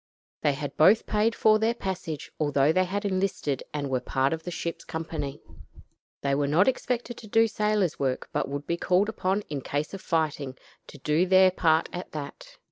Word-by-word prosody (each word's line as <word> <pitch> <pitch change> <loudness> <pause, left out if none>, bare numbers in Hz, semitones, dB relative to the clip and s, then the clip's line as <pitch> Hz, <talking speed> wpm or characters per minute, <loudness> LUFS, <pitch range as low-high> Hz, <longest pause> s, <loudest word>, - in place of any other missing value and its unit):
They 145 - +2
had 145 0 -5
both 190 +8 +6
paid 215 +2 +1
for 215 0 +4
their 225 +2 +1
passage, 180 - -5
although 145 0 +3
they 185 +1 +3
had 200 +3 -3
enlisted 185 -8 -1
and 145 -1 -3
were 130 -1 0
part 135 +3 0
of 160 - -4
the 175 - -6
ship's 170 -1 -4
company. 160 -3 -5 0.8
They 140 0 +1
were 140 +1 +1
not 160 +7 +4
expected 245 -2 -1
to 220 - -11
do 225 +2 +4
sailor's 210 -5 0
work, 130 -2 -1
but - - -1
would 140 +1 -4
be 170 - -1
called 185 +4 +2
upon 195 -1 0
in 150 -8 -5
case 145 +6 -3
of 195 - -6
fighting 150 -5 -1 0.3
to - - -11
do 155 +6 +1
their 185 0 +6
part 160 -3 +2
at 180 - -6
that. 145 -2 -8
165 Hz, 195 wpm, -27 LUFS, 145-195 Hz, 0.8 s, both